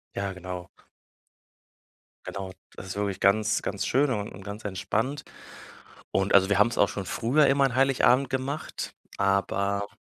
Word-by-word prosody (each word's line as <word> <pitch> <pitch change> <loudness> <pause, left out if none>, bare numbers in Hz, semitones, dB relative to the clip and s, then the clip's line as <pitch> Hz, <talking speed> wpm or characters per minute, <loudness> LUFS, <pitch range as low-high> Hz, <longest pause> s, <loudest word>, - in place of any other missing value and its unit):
Ja, 100 0 -2
genau. 90 -1 -7 1.6
Genau, 95 -1 -5 0.2
das 95 - -9
ist 95 - -5
wirklich 100 -1 -2
ganz, 110 +2 +3
ganz 100 - -3
schön 140 +3 +2
un 105 -4 -2
und 95 +1 -11
ganz 105 +2 -8
entspannt. 110 +8 -2 0.9
Und, 95 0 +1
also, 95 -1 +6
wir 100 - +3
haben's 115 +3 +3
auch - - +4
schon 100 - -5
früher 135 +10 +2
immer 140 0 +4
an 130 -3 -1
Heiligabend 135 0 +4
gemacht, 140 +3 -4 0.2
aber 100 +1 0
100 Hz, 150 wpm, -27 LUFS, 100-130 Hz, 1.6 s, also